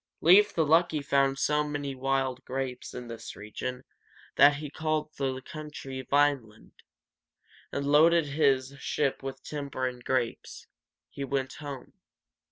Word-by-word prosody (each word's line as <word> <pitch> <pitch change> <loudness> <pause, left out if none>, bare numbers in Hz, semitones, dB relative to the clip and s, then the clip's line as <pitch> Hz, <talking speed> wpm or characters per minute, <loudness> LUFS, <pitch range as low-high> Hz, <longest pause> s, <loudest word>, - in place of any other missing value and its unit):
Leif 195 +5 +6
the 160 - +1
Lucky 160 0 +3
found 140 -1 +2
so 150 +2 +2
many 145 -2 -3
wild 135 0 -1
grapes 130 -1 -5
in 125 -1 -7
this 115 -1 -8
region 125 +5 -6 0.5
that 145 0 +7
he 150 +1 -5
called 155 +1 -2
the 130 -2 -1
country 140 -3 -7
Vine´land, 140 -7 +1 1.0
and 140 - -2
loading 160 +3 +5
his 140 -2 +1
ship 140 -1 -1
with 135 0 -7
timber 140 -3 -4
and 125 -1 -4
grapes, 125 -3 -2 0.5
he 140 - -5
went 135 -1 -2
home. 145 -3 -8
140 Hz, 135 wpm, -28 LUFS, 130-150 Hz, 1.0 s, that